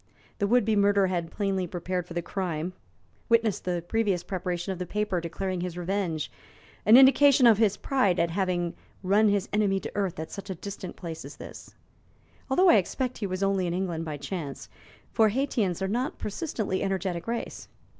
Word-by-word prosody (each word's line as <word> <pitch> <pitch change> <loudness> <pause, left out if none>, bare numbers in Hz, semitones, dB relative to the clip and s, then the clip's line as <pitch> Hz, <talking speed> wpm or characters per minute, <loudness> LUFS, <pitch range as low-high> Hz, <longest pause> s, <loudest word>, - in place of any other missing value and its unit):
The 200 - +1
would 240 0 +3
be 220 -1 +2
murderer 200 -1 +4
had 175 -3 -2
plainly 195 -2 -1
prepared 180 +1 -3
for 170 - -9
the 175 - -1
crime: 175 -2 -3 0.6
witness 230 -3 +3
the 175 -2 -3
previous 205 -5 0
preparation 180 -1 -3
of 185 - -9
the 180 - -4
paper 210 -3 -1
declaring 180 +2 -3
his 180 -1 -4
revenge, 175 -4 -2 0.6
an 220 +3 +9
indication 270 0 +7
of 225 -3 +6
his 210 -3 +3
pride 255 -10 +1
at 170 0 +1
having 175 -2 -1 0.3
run 205 +3 +4
his 200 -1 +1
enemy 205 -2 +2
to - - -6
earth 195 -6 -2
at 160 - -6
such 200 0 -8
a 190 - -3
distant 195 0 -7
place 165 -3 -7
as 140 +3 -9
this - - -11 0.7
although 360 +8 +5
I - - +7
expect 250 +7 -2
he 205 - -2
was 185 +1 -3
only 195 -2 +1
in 170 - -2
England 175 -3 -2
by 155 -2 -5
chance, 145 -1 -6 0.4
for 220 -2 +4
Haytians 210 - -1
are - - 0
not 245 +8 -1
a - - -29
persistently 210 - -3
energetic 190 -2 -2
race. 235 0 -4
190 Hz, 190 wpm, -27 LUFS, 175-210 Hz, 0.7 s, an